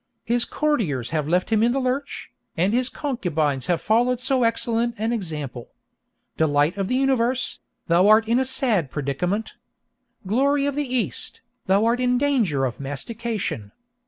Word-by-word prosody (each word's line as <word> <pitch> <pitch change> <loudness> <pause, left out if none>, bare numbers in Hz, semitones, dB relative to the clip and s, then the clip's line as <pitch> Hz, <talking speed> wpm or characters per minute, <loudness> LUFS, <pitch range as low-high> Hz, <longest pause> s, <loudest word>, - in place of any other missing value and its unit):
His 240 0 +1
courtiers 185 - -1
have 155 -2 -1
left 180 +6 0
him 220 -1 +3
in 235 +2 +3
the 275 - 0
lurch, 265 +2 -3 0.3
and 185 +6 +2
his 250 +1 +1
concubines 160 - -2
have 175 -2 +1
followed 240 +3 +2
so 255 +1 +1
excellent 230 0 +1
an 220 +3 -1
example. 150 - -4 0.7
'Delight 145 0 +2
of 195 -1 -2
the 250 - 0
Universe,' 260 -2 +1 0.3
thou 175 +3 +4
art 215 +1 +5
in 235 +2 +3
a - - +2
sad 235 - +1
predicament! 155 +11 -2 0.7
'Glory 275 +7 +2
of 285 - 0
the 285 -2 -3
East,' 220 - -2 0.3
thou 195 +3 +3
art 235 +2 +2
in 250 0 +2
danger 235 - +1
of 125 - -4
mastication! 145 - -4
225 Hz, 160 wpm, -23 LUFS, 160-250 Hz, 0.7 s, art